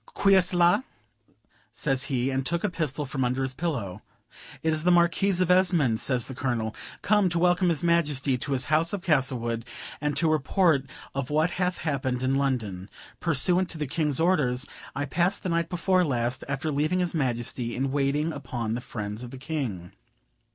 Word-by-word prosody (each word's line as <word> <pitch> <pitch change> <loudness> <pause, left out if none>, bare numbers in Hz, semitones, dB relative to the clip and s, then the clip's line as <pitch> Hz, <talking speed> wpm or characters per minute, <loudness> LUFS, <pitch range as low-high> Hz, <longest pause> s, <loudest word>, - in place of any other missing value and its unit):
"Qui 195 0 +4
est 185 -2 +5
la" 175 +6 +5 0.9
says 135 -2 -1
he, 130 0 -1
and 135 0 -1
took 170 +6 -1
a 210 - +1
pistol 150 -3 -2
from 130 0 -2
under 125 +2 0
his 130 0 -2
pillow. 120 - -3 0.6
"It 160 0 +2
is 155 - 0
the 180 - +3
Marquis 175 +2 +3
of 180 -1 +2
Esmond," 175 -11 +3
says 125 -4 +1
the 130 - -6
Colonel, 120 -4 -2 0.3
"come 205 -2 +3
to 170 - -2
welcome 180 +1 +3
his 165 -3 0
Majesty 150 -6 +2
to 135 +3 -3
his 130 - +1
house 165 +4 +2
of 195 -3 -3
Castlewood, 125 -7 0 0.4
and 150 -1 -1
to 165 - +2
report 155 -1 +2 0.3
of 135 -2 -3
what 155 +3 +2
hath 180 0 -1
happened 130 -5 -2
in 130 +1 +1
London. 115 -9 -1 0.3
Pursuant 175 +3 +2
to - - -6
the 150 - -2
King's 150 0 0
orders, 145 -7 +2 0.3
I 145 - -1
passed 175 +7 0
the 185 - -2
night 170 -1 0
before 185 +1 +2
last, 125 -4 -1
after 140 +3 -2
leaving 150 +5 0
his 180 -2 0
Majesty, 120 -4 -2
in 135 +1 -1
waiting 145 +3 0
upon 120 -6 -4
the 120 - -3
friends 105 -2 -6
of 125 - -7
the 135 - -9
King. 130 - -4
145 Hz, 185 wpm, -26 LUFS, 130-170 Hz, 0.9 s, est